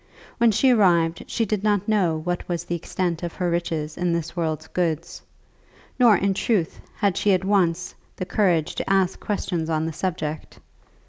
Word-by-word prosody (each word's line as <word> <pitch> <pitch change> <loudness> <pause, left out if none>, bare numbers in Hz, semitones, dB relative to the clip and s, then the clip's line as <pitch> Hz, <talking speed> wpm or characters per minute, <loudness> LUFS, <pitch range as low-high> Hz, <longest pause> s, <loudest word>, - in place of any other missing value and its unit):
When 235 0 +5
she 255 +5 +4
arrived 170 -7 +3
she 230 - 0
did 210 -1 -2
not 205 -2 +1
know 190 -7 +2
what 175 +1 -3
was 175 -1 -2
the - - -4
extent 170 0 -2
of 175 -2 -4
her 175 -2 -1
riches 160 -3 -2
in 175 -1 0
this 170 0 -3
world's 160 -2 -2
goods; 165 -1 -2 0.8
nor, 235 -5 +6
in 195 +1 +1
truth, 190 -4 -1
had 200 -4 +1
she 205 - +2
at 185 0 0
once 180 -3 +1 0.2
the 185 - -4
courage 180 -4 +1
to - - -4
ask 190 -1 +2
questions 175 -5 -2
on 160 0 0
the 160 - -3
subject. 160 -3 -4
175 Hz, 180 wpm, -23 LUFS, 165-195 Hz, 0.8 s, nor